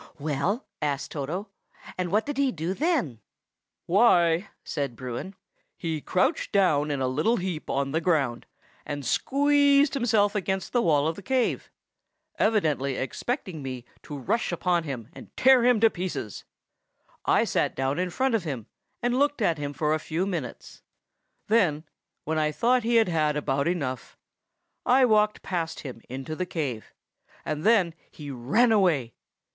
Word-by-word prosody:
"Well?" 155 - -1 0.2
asked 145 -1 -2
Toto, 165 +8 -4 0.5
"and 180 -1 -2
what 210 +2 +2
did 290 -1 -4
he 275 -2 +3
do 170 +2 -3
then?" 270 - 0 0.7
"Why," 180 -2 +4
said 140 -6 -3
Bruin, 130 - -6 0.4
"he 160 -3 -3
crouched 265 - 0
down 155 -8 +3
in 140 -2 -2
a 130 - +1
little 155 - +1
heap 180 -4 -4
on 140 0 -1
the 160 +3 0
ground, 145 -9 0 0.4
and 145 -2 -5
squeezed 285 - +3
himself 220 -6 +2
against 190 -2 -2
the 240 - +3
wall 150 -5 +3
of 160 - -2
the - - -8
cave, 255 +4 0 0.7
evidently 150 - +1
expecting 180 - -4
me 130 -2 -6 0.2
to 145 - -7
rush 180 - -1
upon 175 -1 0
him 125 -7 -5
and - - -13
tear 260 -2 +6
him 245 -2 +4
to 225 - +7
pieces; 175 - -5 0.8
I - - +4
sat - - 0
down 135 +4 -1
in 180 0 0
front 260 +6 0
of 220 -5 +1
him 135 -9 -4 0.4
and 245 +1 +1
looked 290 0 +2
at 170 -8 +1
him 145 -1 -3
for 150 +2 0
a 155 - 0
few 165 +4 -2
minutes; 170 -10 -6 0.6
then, 180 -9 +2 0.4
when 160 +1 -1
I 150 0 +1
thought 245 +10 +2
he 235 +1 0
had 225 -3 +5
had 155 -3 +1
about 140 0 0
enough, 140 -8 -3 0.7
I 255 +1 +5
walked 215 -2 +2
past 170 -3 -3
him 125 -5 -8
into 135 +5 -5
the 185 +2 -3
cave, 135 -11 -4 0.5
and 155 0 -3
then 200 -7 +4 0.2
he 145 -2 -9
ran 145 - +2
away. 165 - +2
170 Hz, 160 wpm, -26 LUFS, 145-220 Hz, 0.8 s, to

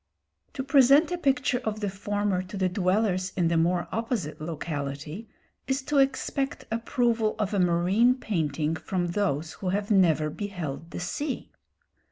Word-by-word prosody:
To 265 - -3
present 275 +4 +5
a 355 - 0
picture 275 -4 +1
of 220 -4 -3
the 205 - -1
former 200 0 -1
to 185 +3 -8
the 190 -1 +2
dwellers 185 0 +1
in 170 -2 +2
the 170 - +1
more 175 +2 +2
opposite 225 - -3
locality 155 +4 -5 0.4
is 265 +1 0
to 290 +1 +1
expect 270 0 0
approval 230 -1 +1
of 210 -1 -1
a 200 - +1
marine 185 +8 +3
painting 160 - -1
from 175 +1 -2
those 170 -5 -1
who 185 - -4
have 200 +3 -1
never 160 -6 +3
beheld 170 -6 -5
the - - -6
sea. 265 - -4
195 Hz, 155 wpm, -27 LUFS, 170-235 Hz, 0.4 s, present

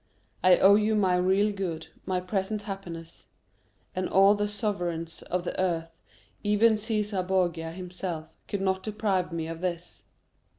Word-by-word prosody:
I 185 -1 +7
owe 195 +1 +7
you 215 +1 +3
my 190 -4 +3
real 190 +3 +3
good, 175 -5 -4 0.2
my 185 -1 +1
present 195 +3 -2
happiness; 170 -5 -8 0.7
and 185 0 -1
all 195 +1 +6
the 205 0 0
sovereigns 175 -6 -3
of 180 0 -2
the 180 - -4
earth, 165 -3 -1 0.5
even 210 +2 +4
Cæsar 210 -3 -1
Borgia 175 -4 0
himself, 180 -2 -5 0.2
could 200 - -3
not 190 -1 +1
deprive 200 -4 -1
me 165 -1 -3
of 165 +1 -6
this." 175 -1 -4
185 Hz, 145 wpm, -28 LUFS, 175-205 Hz, 0.7 s, I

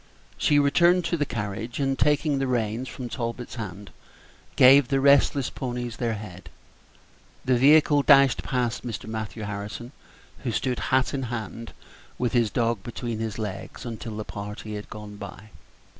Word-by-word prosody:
She 145 - +2
returned 170 +5 +4
to - - 0
the 145 -3 -1
carriage, 110 +3 -4
and, 135 -1 +1
taking 150 -1 +2
the 135 - 0
reins 120 0 -1
from 125 - -6
Talbot's 120 0 -5
hand, 105 -4 -7 0.6
gave 135 +1 +7
the 135 -1 +1
restless 140 -1 +4
ponies 120 -2 -4
their 115 -3 -1
head; 100 -3 -9 1.0
the 130 -1 +3
vehicle 145 +3 +5
dashed 140 -2 +5
past 125 -4 -2
Mr. 115 -6 -5
Matthew 110 0 -5
Harrison, 105 +4 -6 0.5
who 125 - -3
stood 125 +2 -1
hat 130 +1 +2
in 140 - -1
hand, 115 -2 -5 0.4
with 125 0 -1
his 120 -3 +3
dog 115 -1 0
between 120 0 -5
his 110 -2 -3
legs, 105 +3 -6
until 115 -2 -6
the 110 - -4
party 105 +1 -7
had 105 0 -7
gone 105 -1 -9
by. 100 +1 -10
120 Hz, 160 wpm, -25 LUFS, 110-135 Hz, 1.0 s, gave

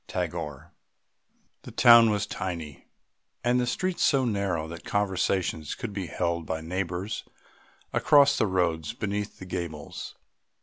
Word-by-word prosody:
TAGORE. 75 -3 -4 0.9
The - - -10
town 120 -1 +8
was 105 -1 0
tiny 85 -8 -6 0.6
and 120 +1 +3
the 125 - 0
streets 185 +8 -1
so 135 -3 +3
narrow 100 -8 -1
that 85 +1 -9
conversation 95 -4 0
could 115 -5 -5
be 95 -3 -4
held 85 +2 -1
by 80 - -2
neighbours 90 +4 -3 0.7
across 140 -2 +5
the 110 - +2
road 90 +2 0
beneath 105 0 -3
the 95 - -9
gables. 85 -5 -6
95 Hz, 130 wpm, -27 LUFS, 85-110 Hz, 0.9 s, town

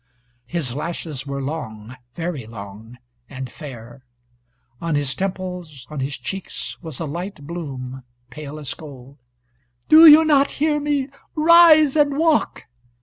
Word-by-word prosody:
His 150 -5 -2
lashes 150 -2 -5
were 140 0 -4
long, 125 -6 -6 0.2
very 165 -9 -4
long, 110 +2 -11 0.3
and 130 -2 -7
fair. 125 -4 -11 0.8
On 165 -2 -1
his 145 -2 0
temples, 180 -7 -5
on 150 - -5
his 135 +1 -3
cheeks 195 -1 -6
was 160 -6 -7
a 165 - -3
light 170 +1 -6
bloom, 135 -6 -6 0.3
pale 150 +2 -8
as 145 -4 -5
gold. 140 -3 -13 0.7
"Do 320 +1 +10
you 310 +1 +9
not 285 -2 +4
hear 295 0 +1
me? 290 -2 -1 0.3
Rise 315 -2 +6
and 290 -2 +2
walk." 320 -1 +1
155 Hz, 135 wpm, -21 LUFS, -, 0.8 s, Do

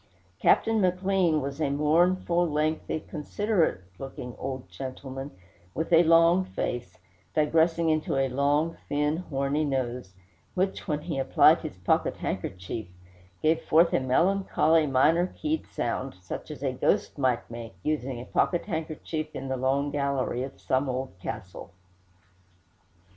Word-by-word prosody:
Captain 225 -1 +3
McLean 185 -3 +2
was 140 +3 -5
a 145 - +2
mournful, 170 +4 +2
lengthy, 155 +1 -1
considerate 170 - -1 0.2
looking 130 -2 -7
old 130 -5 -5
gentleman, 130 +7 -7 0.5
with 165 +2 -2
a 165 - +8
long 165 +2 +5
face, 120 -9 -4 0.4
digressing 165 +2 +3
into 155 -2 0
a 135 0 +2
long, 145 +5 +1
thin, 150 +2 +1
horny 145 -3 -1
nose, 125 -8 -2 0.4
which, 190 +1 -1
when 150 -3 -1
he 160 -3 -3
applied 135 - +5
his - - -7
pocket - - +1
handkerchief, 95 +4 -4 0.6
gave 160 +1 +3
forth 165 +2 +4
a - - +4
melancholy, 165 +2 +2
minor 155 +7 +3
keyed 310 +9 -3
sound, - - -3
such - - -7
as - - -8
a - - 0
ghost - - 0
might 130 -3 +1
make, 115 -4 -8
using 135 -5 -2
a 120 - -7
pocket 175 -2 +1
handkerchief 160 -2 -4
in 135 - -5
the 130 - 0
long 135 +3 0
gallery 140 -3 -1
of 135 +1 -6
some 130 +1 0
old 130 +1 -3
castle. 90 -3 -7
150 Hz, 135 wpm, -27 LUFS, 130-165 Hz, 0.6 s, a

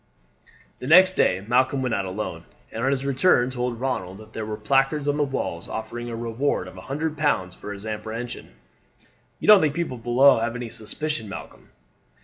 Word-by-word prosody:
The 125 - -6
next 185 +4 +7
day 95 - +1
Malcolm 130 +3 +2
went 125 -3 -1
out 100 - 0
alone, 95 +3 -5 0.3
and 115 - -4
on 135 - +3
his 140 0 -1
return 130 -2 +3
told 125 -2 -3
Ronald 95 -8 -3
that 110 +1 -14
there 110 -1 -4
were 105 0 -4
placards 135 +6 +1
on 145 - +2
the - - +1
walls 135 -11 -3
offering 120 +2 -5
a 115 - -4
reward 115 -2 -1
of 90 - -11
a 95 - -9
hundred 150 +7 -3
pounds 145 -12 0
for 105 - -8
his 100 +1 -8
apprehension. 110 +2 -6 0.8
"You - - -5
don't 210 -3 +9
think 150 -2 +1
the 170 - +1
people 130 -6 -6
below 120 +2 +5
have 115 +1 -2
any 120 -1 -5
suspicion, 115 +1 -4
Malcolm?" 95 - -10
120 Hz, 195 wpm, -24 LUFS, 110-140 Hz, 0.8 s, don't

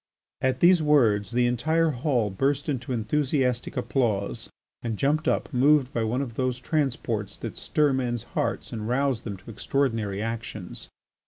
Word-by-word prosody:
At 130 0 0
these 175 -1 +6
words 120 -9 +3
the 120 0 +2
entire 155 +7 +2
hall 125 -5 0
burst 135 +7 0
into 130 -2 -3
enthusiastic 130 +1 0
applause 120 -5 -1 0.3
and 115 -3 -3
jumped 150 +5 +1
up, - - 0
moved 140 +1 +4
by 115 - 0
one 120 +5 0
of 120 -4 -7
those 130 +1 -1
transports 125 -7 -2
that - - -6
stir 150 -2 +1
men's 120 -3 -1
hearts - - -3
and 110 -1 -4
rouse 135 -2 +1
them 100 -4 -6
to 100 +5 -11
extraordinary 115 -4 -1
actions. 110 -4 -5
125 Hz, 155 wpm, -26 LUFS, 115-140 Hz, 0.3 s, these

